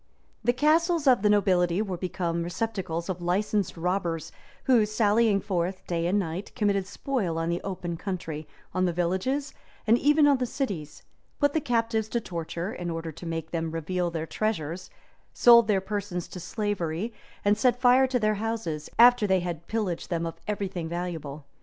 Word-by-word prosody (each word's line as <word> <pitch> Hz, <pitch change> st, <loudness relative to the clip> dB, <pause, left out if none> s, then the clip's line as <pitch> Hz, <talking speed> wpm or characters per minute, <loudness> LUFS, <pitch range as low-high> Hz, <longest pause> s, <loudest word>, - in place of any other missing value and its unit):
The 240 Hz, -, +4 dB
castles 315 Hz, +5 st, +2 dB
of 255 Hz, -6 st, +5 dB
the 210 Hz, -, +3 dB
nobility 185 Hz, -4 st, +3 dB
were 200 Hz, -4 st, -1 dB
become 175 Hz, -1 st, -2 dB
receptacles 175 Hz, -2 st, -3 dB
of 185 Hz, -2 st, -4 dB
licensed 200 Hz, +3 st, 0 dB
robbers, 170 Hz, -2 st, -1 dB, 0.3 s
who, 245 Hz, -4 st, +5 dB
sallying 215 Hz, 0 st, +3 dB
forth 185 Hz, -1 st, -2 dB
day 170 Hz, -1 st, -1 dB
and 190 Hz, +4 st, +2 dB
night, 185 Hz, 0 st, -3 dB
committed 200 Hz, -3 st, +1 dB
spoil 200 Hz, -5 st, -2 dB
on 165 Hz, 0 st, -1 dB
the 170 Hz, +1 st, -1 dB
open 175 Hz, -3 st, -4 dB
country, 165 Hz, -5 st, -5 dB, 0.3 s
on 185 Hz, +1 st, +1 dB
the 175 Hz, -, 0 dB
villages, 190 Hz, -, -1 dB, 0.3 s
and 230 Hz, +2 st, +4 dB
even 295 Hz, +2 st, +4 dB
on 285 Hz, -2 st, +5 dB
the 250 Hz, -, 0 dB
cities; 190 Hz, -, -4 dB, 0.4 s
put 285 Hz, -1 st, +3 dB
the 315 Hz, -, +1 dB
captives 230 Hz, -3 st, 0 dB
to 235 Hz, -, 0 dB
torture, 170 Hz, 0 st, -4 dB
in 175 Hz, -1 st, -4 dB
order 165 Hz, -1 st, -4 dB
to 170 Hz, +3 st, -9 dB
make 165 Hz, -1 st, -4 dB
them 165 Hz, -1 st, -2 dB
reveal 175 Hz, +2 st, -2 dB
their 165 Hz, -1 st, -3 dB
treasures; 180 Hz, -4 st, -3 dB, 0.4 s
sold 235 Hz, -2 st, +7 dB
their 205 Hz, -3 st, +3 dB
persons 195 Hz, -3 st, -4 dB
to 180 Hz, -, -8 dB
slavery; 200 Hz, +1 st, -2 dB, 0.3 s
and 205 Hz, +1 st, +5 dB
set 245 Hz, +1 st, +2 dB
fire 255 Hz, +1 st, +5 dB
to 255 Hz, -1 st, +1 dB
their 215 Hz, -1 st, +2 dB
houses, 220 Hz, -10 st, -3 dB
after 245 Hz, -2 st, +7 dB
they 190 Hz, -1 st, +3 dB
had 170 Hz, -2 st, -5 dB
pillaged 205 Hz, -8 st, -2 dB
them 170 Hz, -2 st, -1 dB
of 165 Hz, -, -3 dB
every 205 Hz, -1 st, -1 dB
thing 175 Hz, -4 st, -5 dB
valuable. 165 Hz, -5 st, -5 dB
190 Hz, 180 wpm, -27 LUFS, 170-225 Hz, 0.4 s, sold